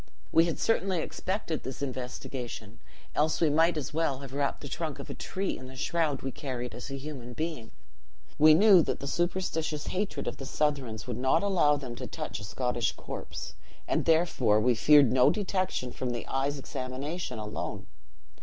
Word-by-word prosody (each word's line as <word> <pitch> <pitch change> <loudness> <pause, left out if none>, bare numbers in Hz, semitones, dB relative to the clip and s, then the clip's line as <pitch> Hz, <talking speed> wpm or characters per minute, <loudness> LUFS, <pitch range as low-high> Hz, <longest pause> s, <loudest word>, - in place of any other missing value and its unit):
We 165 +1 +6
had 170 - -2
certainly 195 -5 +1
expected 185 -1 -3
this 130 +2 -6
investigation; 125 -4 -5 0.3
else 155 +1 +2
we 160 -3 +3
might 165 +2 +4
as 150 0 -4
well 150 -4 0
have 135 -2 -8
wrapped 140 0 -1
the 145 - -6
trunk 155 0 -3
of - - -7
a - - -4
tree 195 +1 -3
in 130 - -9
the 130 - -11
shroud 150 0 0
we 135 - -2
carried 125 -4 -5
as 120 +4 -7
a 135 - -4
human 135 -4 -7
being. 155 -6 -4 0.7
We 155 +1 +8
knew 195 0 +8
that - - -1
the - - -6
superstitious 160 -1 -1
hatred 200 +2 -2
of - - -3
the 135 - -7
Southrons 135 -7 -1
would 125 -3 -4
not 130 +7 +3
allow 170 -7 +4
them 130 -4 -6
to 125 0 -5
touch - - -5
a - - -9
Scottish 120 +2 -1
corpse, - - -7 0.3
and - - +1
therefore 160 -10 +3
we 125 +3 +4
feared 140 +2 +6
no 130 +2 +6
detection 185 -8 -1
from 130 - -3
the 120 -1 -3
eye's 140 +2 0
examination 135 +2 -4
alone. 105 -1 -4
140 Hz, 180 wpm, -29 LUFS, 125-165 Hz, 0.7 s, We